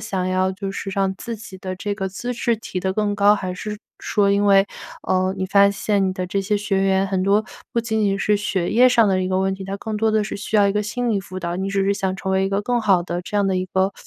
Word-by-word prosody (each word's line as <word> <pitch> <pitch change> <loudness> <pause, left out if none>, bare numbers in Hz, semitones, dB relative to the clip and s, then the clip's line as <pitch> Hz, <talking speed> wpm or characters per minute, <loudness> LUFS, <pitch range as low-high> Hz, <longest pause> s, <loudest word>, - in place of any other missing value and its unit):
想 190 -4 -2
要 185 0 +1
就 195 +1 -5
是 195 - -5
让 195 -1 0
自 230 +2 -6
己 200 -3 -11
的 185 0 -5
这 205 +1 -3
个 195 -2 -3
资 240 +6 -4
质 235 -1 0
提 190 -4 -5
得 190 0 -1
更 210 -1 0
高， 205 +1 +5
还 185 -3 -3
是 210 +3 -6 0.2
说 200 -2 +1
因 200 +1 +2
为， 195 0 +5 0.4
呃， 185 0 +1
你 185 - -2
发 200 +1 +5
现 200 -1 0
你 - - -1
的 185 -1 -4
这 195 +2 -1
些 205 +2 0
学 200 -1 0
员 190 0 +2
很 190 -1 -1
多 205 +3 +3 0.3
不 235 - +1
仅 220 -1 -1
仅 195 -1 +1
是 210 0 +2
学 190 -4 -1
业 250 +2 +6
上 230 -3 +4
的 190 -1 +2
一 185 - -1
个 185 0 +1
问 190 0 0
题， 190 0 -8
他 195 +1 -4
更 215 +1 -4
多 220 +1 +2
的 215 -1 +2
是 210 - -5
需 210 +1 -2
要 200 -1 +5
一 200 - +1
个 210 0 0
心 240 +3 -2
理 200 -2 +1
辅 185 0 -8
导， 175 -1 -3
你 190 +1 -2
只 195 -1 0
是 200 - +2
想 190 -2 -1
成 190 0 -3
为 190 0 +2
一 195 - 0
个 200 +1 -1
更 240 +1 0
好 190 -5 +3
的 175 0 -3
这 205 - -4
样 200 -1 +2
的 190 -1 +1
一 185 0 -1
个 190 +2 0
195 Hz, 315 characters per minute, -21 LUFS, 190-210 Hz, 0.4 s, 业